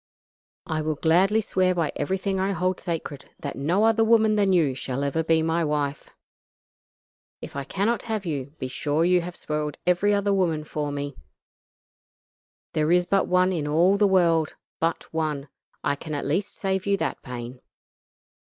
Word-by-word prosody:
"I 155 Hz, -1 st, -2 dB
will 155 Hz, 0 st, -1 dB
gladly 185 Hz, +8 st, +3 dB
swear 185 Hz, -3 st, +1 dB
by 165 Hz, -4 st, 0 dB
everything 190 Hz, +5 st, -1 dB
I 195 Hz, +1 st, 0 dB
hold 185 Hz, +1 st, -1 dB
sacred 160 Hz, -5 st, -5 dB
that 140 Hz, -, -5 dB
no 170 Hz, +9 st, +1 dB
other 225 Hz, 0 st, +4 dB
woman 220 Hz, -1 st, +4 dB
than 200 Hz, -2 st, +3 dB
you 160 Hz, -7 st, +3 dB
shall 130 Hz, +1 st, -3 dB
ever 140 Hz, +3 st, 0 dB
be 160 Hz, 0 st, +2 dB
my 165 Hz, +1 st, +1 dB
wife. 145 Hz, -2 st, -2 dB, 1.3 s
If -, -, -9 dB
I 140 Hz, -1 st, -3 dB
cannot 205 Hz, -, 0 dB
have 220 Hz, -4 st, -3 dB
you, 145 Hz, -3 st, -4 dB
be 130 Hz, -, -4 dB
sure 150 Hz, +5 st, 0 dB
you 180 Hz, 0 st, +4 dB
have 175 Hz, +1 st, -7 dB
spoiled 150 Hz, -1 st, -3 dB
every 180 Hz, +3 st, +3 dB
other 200 Hz, 0 st, +2 dB
woman 170 Hz, -5 st, +1 dB
for 150 Hz, -1 st, -3 dB
me. 145 Hz, -1 st, -4 dB, 1.6 s
There 155 Hz, +1 st, +1 dB
is 180 Hz, 0 st, +4 dB
but 195 Hz, +1 st, +2 dB
one 185 Hz, +1 st, +3 dB
in 155 Hz, -4 st, -2 dB
all 170 Hz, +6 st, +4 dB
the 205 Hz, 0 st, +4 dB
world 170 Hz, -4 st, +3 dB, 0.2 s
but 165 Hz, +1 st, 0 dB
one. 150 Hz, -3 st, -2 dB, 0.3 s
I 140 Hz, -, +1 dB
can 155 Hz, +1 st, -6 dB
at 145 Hz, -, -3 dB
least 180 Hz, +8 st, -1 dB
save 190 Hz, -1 st, -2 dB
you 200 Hz, 0 st, +3 dB
that -, -, -3 dB
pain." 125 Hz, 0 st, -7 dB
165 Hz, 170 wpm, -25 LUFS, 150-190 Hz, 1.6 s, other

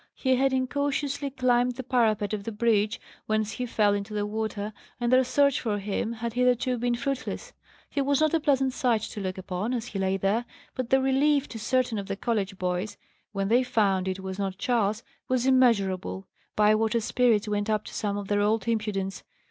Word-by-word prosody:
He 260 Hz, -1 st, +2 dB
had 270 Hz, +1 st, +2 dB
incautiously 280 Hz, +2 st, -1 dB
climbed 250 Hz, -2 st, +1 dB
the 260 Hz, -, -5 dB
parapet 220 Hz, -5 st, +1 dB
of 205 Hz, -2 st, -3 dB
the 230 Hz, -, -4 dB
bridge, 215 Hz, 0 st, +1 dB, 0.3 s
whence 215 Hz, 0 st, 0 dB
he 250 Hz, +1 st, -4 dB
fell 210 Hz, -3 st, +2 dB
into 205 Hz, +1 st, -3 dB
the 205 Hz, 0 st, 0 dB
water, 215 Hz, 0 st, -3 dB, 0.3 s
and 240 Hz, +1 st, +1 dB
their 260 Hz, +1 st, +6 dB
search 280 Hz, +1 st, +2 dB
for 215 Hz, -4 st, -1 dB
him 205 Hz, +3 st, -2 dB
had 230 Hz, 0 st, -4 dB
hitherto 250 Hz, 0 st, +2 dB
been 240 Hz, 0 st, +1 dB
fruitless. 275 Hz, -, -4 dB, 0.3 s
He 280 Hz, -, -2 dB
was 280 Hz, 0 st, +2 dB
not 310 Hz, 0 st, +2 dB
a 330 Hz, -, +3 dB
pleasant 270 Hz, -3 st, +2 dB
sight 240 Hz, -4 st, +1 dB
to 210 Hz, -, -6 dB
look 185 Hz, -1 st, -3 dB
upon, 190 Hz, +6 st, -3 dB
as 235 Hz, -2 st, -3 dB
he 215 Hz, -5 st, -5 dB
lay 190 Hz, 0 st, +1 dB
there; 200 Hz, +5 st, 0 dB, 0.3 s
but 255 Hz, -3 st, -4 dB
the 265 Hz, -, +5 dB
relief 280 Hz, +2 st, +2 dB
to 225 Hz, -, -7 dB
certain 250 Hz, -1 st, 0 dB
of 195 Hz, -, -6 dB
the 195 Hz, -, -2 dB
college 200 Hz, -3 st, -2 dB
boys, 180 Hz, +3 st, -2 dB, 0.3 s
when 195 Hz, -2 st, -1 dB
they 235 Hz, +4 st, +4 dB
found 195 Hz, -6 st, +1 dB
it 190 Hz, 0 st, -3 dB
was 190 Hz, +1 st, -6 dB
not 195 Hz, -1 st, -2 dB
Charles, 220 Hz, -1 st, 0 dB, 0.2 s
was 255 Hz, -1 st, +1 dB
immeasurable. 200 Hz, -8 st, +2 dB, 0.3 s
Bywater's 215 Hz, +1 st, +3 dB
spirits 230 Hz, -4 st, +2 dB
went 205 Hz, 0 st, -1 dB
up 215 Hz, -1 st, +1 dB
to -, -, -9 dB
some 205 Hz, -1 st, -2 dB
of 200 Hz, -1 st, -5 dB
their 205 Hz, 0 st, +1 dB
old 210 Hz, 0 st, +1 dB
impudence. 210 Hz, -4 st, -1 dB
225 Hz, 200 wpm, -27 LUFS, 205-255 Hz, 0.3 s, their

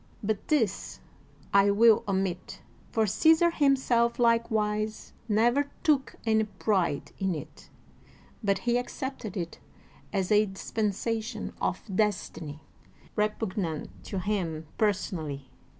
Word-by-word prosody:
But 210 Hz, 0 st, -2 dB
this 235 Hz, -, 0 dB, 0.5 s
I 200 Hz, 0 st, +6 dB
will 215 Hz, +2 st, +5 dB
omit, 190 Hz, -2 st, -2 dB, 0.3 s
for 220 Hz, -1 st, +2 dB
Caesar 320 Hz, -, +4 dB
himself 260 Hz, -6 st, +2 dB
likewise 220 Hz, -2 st, +1 dB, 0.2 s
never 240 Hz, +7 st, +3 dB
took 290 Hz, -4 st, +2 dB
any 220 Hz, -1 st, +3 dB
pride 195 Hz, -7 st, 0 dB
in 190 Hz, -3 st, 0 dB
it, 150 Hz, -, -10 dB, 0.7 s
but 200 Hz, -1 st, +2 dB
he 240 Hz, 0 st, +3 dB
accepted 245 Hz, -4 st, -5 dB
it 170 Hz, -2 st, -4 dB, 0.5 s
as 190 Hz, -1 st, -1 dB
a 210 Hz, 0 st, +5 dB
dispensation 220 Hz, +3 st, -2 dB
of 185 Hz, -, -1 dB
destiny, 180 Hz, -7 st, -1 dB, 0.5 s
repugnant 205 Hz, -6 st, -1 dB
to 195 Hz, -, -4 dB
him 180 Hz, -5 st, -2 dB
per 215 Hz, -1 st, +5 dB
sonally. 160 Hz, -8 st, -5 dB
210 Hz, 110 wpm, -28 LUFS, 190-230 Hz, 0.7 s, I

